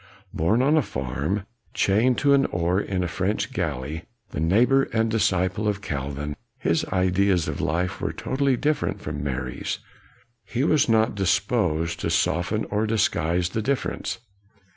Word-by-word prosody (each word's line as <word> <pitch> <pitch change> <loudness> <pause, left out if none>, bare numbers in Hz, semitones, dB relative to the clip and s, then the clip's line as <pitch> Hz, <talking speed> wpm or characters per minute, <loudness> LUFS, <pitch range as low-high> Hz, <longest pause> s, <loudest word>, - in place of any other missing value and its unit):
Born 105 +10 +2
on 150 +4 +4
a - - +5
farm, 80 - -3 0.3
chained 115 +5 +3
to 140 -1 +4
an 135 -1 +4
oar 90 +2 0
in 95 -3 -2
a - - -1
French 100 +8 -1
galley, 80 - -3 0.3
the - - -4
neighbor 120 - +4
and 110 0 +1
disciple 100 -1 +1
of 105 -1 -1
Calvin, 70 +1 -4 0.2
his 80 - +1
ideas 95 -1 +2
of - - -3
life 90 +4 -1
were - - -1
totally 135 -1 0
different 150 +3 0
from 75 -2 -5
Mary's. 65 -2 -3 0.7
He 125 +2 -2
was 155 -4 +3
not 110 0 +3
disposed 90 -4 0
to - - -1
soften 100 +6 +1
or 105 +2 +1
disguise 90 -5 +1
the 110 - -2
difference. 135 +4 -2
95 Hz, 150 wpm, -24 LUFS, 80-115 Hz, 0.7 s, a